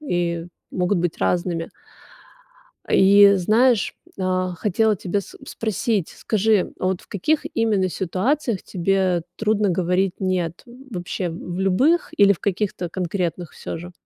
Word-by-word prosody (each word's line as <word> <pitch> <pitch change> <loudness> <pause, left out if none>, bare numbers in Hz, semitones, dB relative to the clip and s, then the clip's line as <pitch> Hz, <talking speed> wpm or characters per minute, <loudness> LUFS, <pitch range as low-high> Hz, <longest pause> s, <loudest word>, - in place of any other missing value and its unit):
и 175 - -2 0.2
могут 180 +1 0
быть 175 -1 -2
разными. 170 -2 -1 1.2
И 200 +1 +7
знаешь, 220 +4 +2 0.2
а, 185 -1 0
хотела 210 +4 +1
тебя 190 +2 -2
с - - -13
спросить, 215 -3 -1
скажи, 215 -2 +1
а - - -2
вот 185 -1 0
в - - -20
каких 295 - 0
именно 210 -5 +2
ситуациях 205 - -1
тебе 185 -2 0
трудно 215 -1 +1
говорить 180 +1 +1
нет- 180 -3 -1
вообще 235 -8 -5
в 175 +2 -6
любых 260 - +2
или 200 0 +6
в 185 - -2
каких-то 190 -3 -2
конкретных 175 -2 -3
всё - - -6
же? 175 +2 -9
190 Hz, 130 wpm, -22 LUFS, 175-210 Hz, 1.2 s, И